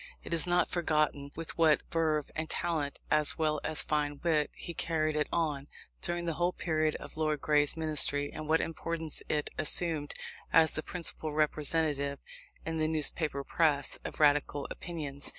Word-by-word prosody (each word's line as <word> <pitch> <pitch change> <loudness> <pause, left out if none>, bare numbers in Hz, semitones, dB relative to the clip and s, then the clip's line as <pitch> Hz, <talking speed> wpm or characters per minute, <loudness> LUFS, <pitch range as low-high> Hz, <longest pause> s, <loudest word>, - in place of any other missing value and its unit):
It - - -5
is 165 -1 +7
not 175 -1 +3
forgotten 155 -4 0
with 165 0 -6
what 160 -2 +5
verve 155 -3 0
and 160 0 -3
talent, 155 -5 -1
as 150 -1 +2
well 155 -2 0
as 155 - +1
fine 145 -1 -1
wit, 155 -3 +2
he 170 - -7
carried 155 -2 0
it 150 -1 +1
on, 150 -4 -1 0.3
during 175 0 -1
the 165 - -1
whole 175 +3 0
period 155 -2 0
of - - -9
Lord 155 -1 0
Grey's 145 +1 +2
Ministry, 145 -2 +1
and 155 - -6
what 160 +1 +4
importance 165 -1 -3
it 150 -1 -1
assumed 155 -1 +2 0.4
as 160 -1 +5
the 155 - -3
principal 160 -2 -4
representative, 150 -2 0 0.5
in 160 0 -2
the 155 - +2
newspaper 155 -2 0
press, 145 -2 +2
of - - -6
Radical 145 -1 +2
opinions. 145 -5 -3
155 Hz, 165 wpm, -31 LUFS, 150-165 Hz, 0.5 s, is